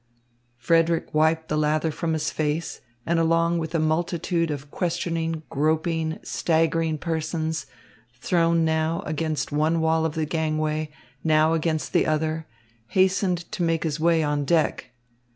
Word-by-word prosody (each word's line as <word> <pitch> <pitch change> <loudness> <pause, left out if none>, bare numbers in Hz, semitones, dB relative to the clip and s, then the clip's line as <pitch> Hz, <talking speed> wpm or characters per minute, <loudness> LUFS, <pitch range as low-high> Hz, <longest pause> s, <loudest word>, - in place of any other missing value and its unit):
Frederick 165 +6 +1
wiped 160 +1 +2
the 155 - -1
lather 155 +1 +1
from 165 +1 -2
his 155 -1 -1
face 155 +1 -2 0.2
and, 170 0 +1
along 165 +1 +2
with 160 +1 -4
a - - +2
multitude 165 +1 0
of 145 -1 -5
questioning, 165 -2 -2
groping, 160 +2 0
staggering 165 -1 +1
persons, 160 0 -2 0.5
thrown 165 +5 +2
now 160 +1 0
against 155 0 -2
one 155 +3 +1
wall 160 0 +2
of 160 -1 -1
the 160 -1 0
gangway, 155 -1 -1 0.3
now 155 0 +3
against 160 -1 -1
the - - +3
other, 155 +1 -1 0.4
hastened 185 - +1
to 215 -4 -4
make 165 -1 +1
his 155 -1 -2
way 165 0 +3
on 145 -1 0
deck. 155 -4 +1
160 Hz, 140 wpm, -24 LUFS, 155-165 Hz, 0.5 s, now